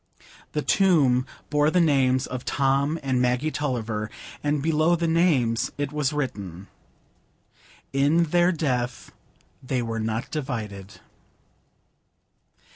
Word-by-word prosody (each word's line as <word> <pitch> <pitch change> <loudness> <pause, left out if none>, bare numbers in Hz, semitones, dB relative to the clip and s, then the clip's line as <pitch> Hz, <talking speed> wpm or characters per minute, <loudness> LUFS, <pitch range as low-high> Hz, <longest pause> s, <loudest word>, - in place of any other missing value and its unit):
The 150 - -1
tomb 140 -10 +3 0.2
bore 150 0 +3
the 180 - +2
names 135 -5 +3
of 130 0 -6
Tom 140 +3 +1
and 130 -2 +1
Maggie 125 +5 +1
Tulliver, 115 -8 -2 0.3
and 145 0 +1
below 160 +2 +3
the 170 0 -1
names 155 -9 +2
it 145 -1 -2
was 150 -2 0
written,— 100 - -4 1.3
"In 145 +5 +3
their 175 +2 +3
death 125 -7 -2 0.5
they 130 -1 -2
were 115 -1 -3
not 110 +1 -3
divided." 110 -9 -5
135 Hz, 115 wpm, -25 LUFS, 120-155 Hz, 1.3 s, tomb